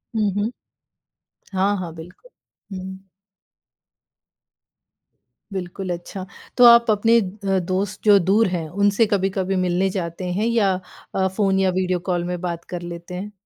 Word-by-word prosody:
हुँ, 210 -3 +1
हुँ। 205 +3 -1 1.0
हाँ, 195 +2 +2
हाँ, 170 -3 -6
बिल्कुल। 175 - -13 0.5
हुँ। 190 +1 -9 2.5
बिल्कुल, 185 0 -5
अच्छा। 180 +2 -7 0.3
तो 250 - +6
आप 235 -1 +7
अपने 225 +3 +4
अ, 195 0 -2
दोस्त 185 +2 -2
जो 205 -1 +7
दूर 200 +5 +3
हैं 175 -3 -3
उनसे 205 +5 +2
कभी-कभी 195 -1 0
मिलने 185 +1 +1
जाते 180 -1 -4
हैं 205 +4 0
या 220 -5 +2 0.4
अ, 190 0 +2
फ़ोन 190 0 +1
या 190 -1 +3
वीडियो 185 -1 0
कॉल 175 -1 0
में 180 0 -3
बात 170 -2 -4
कर 175 -1 -6
लेते 170 0 -8
हैं? 200 +3 -6
190 Hz, 145 wpm, -22 LUFS, 180-205 Hz, 2.5 s, आप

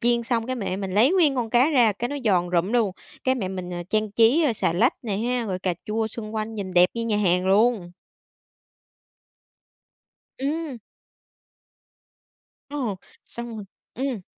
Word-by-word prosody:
chiên 235 0 +2
xong, 230 -1 -1
cái, 255 0 -2
mẹ 195 -4 -3
mình 195 -2 -4
lấy 240 - +5
nguyên 320 -7 +4
con 235 -3 -1
cá 250 +6 +4
ra, 240 -7 +4
cái, 235 +5 -3
nó 290 - -4
giòn 180 -5 +2
rụm 180 +4 +1
luôn, 225 -6 +2 0.3
cái, 260 0 +3
mẹ 195 -7 -3
mình, 185 -1 -5
ờ, 175 0 -4
trang 215 0 0
trí, 230 +10 +4
a, 245 - +2
xà 205 - 0
lách 220 +9 +3
nè 210 -5 -2
ha, 240 +2 -1
rồi 185 -2 -2
cà 185 -1 -1
chua 220 +1 -1
xung 220 0 -7
quanh 220 +1 -3
nhìn 195 -3 -5
đẹp 180 0 +6
như 230 0 -2
nhà 215 - +1
hàng 180 -2 +2
luôn. 205 -2 +3 2.5
Ừm. 290 -2 -2 1.9
Ồ! 250 -9 -2 0.3
Xong 235 -1 -7
rồi 210 - -7 0.3
ừm. 255 -6 -3
225 Hz, 175 wpm, -24 LUFS, 195-245 Hz, 2.5 s, đẹp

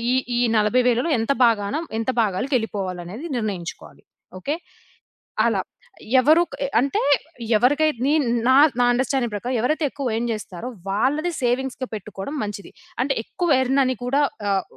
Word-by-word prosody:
ఈ - - +3 0.2
ఈ - - +2 0.2
40,000లో 245 +6 +2
ఎంత 225 +5 0
భాగాన 205 0 +1 0.2
ఎంత 225 - -2
భాగాలకు 235 +8 -1
ఎళ్ళిపోవాలనేది 195 - -5
నిర్ణయించుకోవాలి. 195 -6 -5 0.4
ఓకే. 290 - -2 0.9
అలా. - - +2 0.6
ఎవరు 310 +6 +5
క్ - - -6 0.2
అంటే, 275 +2 0 0.6
ఎవరికైతే 290 +2 +2
నీ 285 - +2 0.4
నా 260 - +6 0.2
నా 245 - +4
అండర్‌స్టాండింగ్ 250 -2 0
ప్రకారం 245 +5 -3
ఎవరైతే 305 +4 +1
ఎక్కువ 275 -2 -4
ఎర్న్ 235 +1 -1
చేస్తారో, 210 0 -6 0.2
వాళ్ళది 285 - +1
సేవింగ్స్‌గా 255 +1 -1
పెట్టుకోవడం 210 +6 -6
మంచిది. 205 -1 -6 0.3
అంటే 275 +1 +1
ఎక్కువ 355 - -3
ఎర్న్ 265 +2 +1
అని 255 0 0
కూడా 275 +4 +1 0.3
ఆహ్, 195 -1 +1
245 Hz, 140 wpm, -22 LUFS, 210-275 Hz, 0.9 s, నా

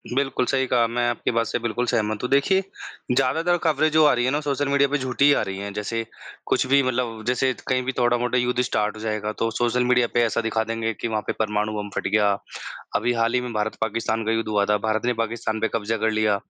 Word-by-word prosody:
बिल्कुल 135 -2 0
सही 130 -1 +1
कहा। 120 -2 +3
मैं 120 +1 -1
आपकी 120 - -1
बात 115 -1 +1
से 120 - -2
बिल्कुल 120 +1 -2
सहमत 110 -1 -1
हूँ। 125 - -1
देखिए 140 +8 +3 0.5
ज़्यादातर 160 +7 +2
कवरेज़ 155 -1 +2
जो 155 -1 +6
आ 150 - +5
रही 120 0 +1
है 130 - +1
ना 145 - +1
सोशल 145 -1 -1
मीडिया 140 0 +3
पे 145 - +1
झूठी 130 0 0
ही 145 - +7
आ - - +1
रही 95 - -5
हैं। 100 +1 -5
जैसे 105 +3 -3 0.4
कुछ - - +1
भी 140 +1 +5
मतलब 120 -3 -2
जैसे 125 +1 +2 0.2
कहीं 130 -1 +1
भी 130 - -1
थोड़ा-मोड़ा 120 0 +1
युद्ध 125 0 +1
स्टार्ट 105 -3 -1
हो 110 - -9
जाएगा। 110 -1 -2
तो 115 - +1
सोशल 120 +2 +1
मीडिया 125 -1 +3
पे 120 - +3
ऐसा 115 +1 0
दिखा 110 0 0
देंगे 115 0 -2
कि 115 - -4
वहाँ 110 -2 -1
पे - - 0
परमाणु 105 -1 0
बम 105 -1 -4
फ़ट - - -1
गया। 105 0 +3 0.6
अभी 120 +3 +1
हाल 115 0 +1
ही 125 - +2
में 125 -1 -5
भारत 105 0 -1
पाकिस्तान 110 0 -1
का 110 - +1
युद्ध 115 0 -1
हुआ 105 -1 +2
था। 105 0 +2
भारत 110 +1 0
ने 125 - +2
पाकिस्तान 115 -1 -3
पे 110 - +2
क़ब्ज़ा 115 0 -1
कर 110 +1 +1
लिया। 110 -1 +2
115 Hz, 250 wpm, -23 LUFS, 110-130 Hz, 0.6 s, ही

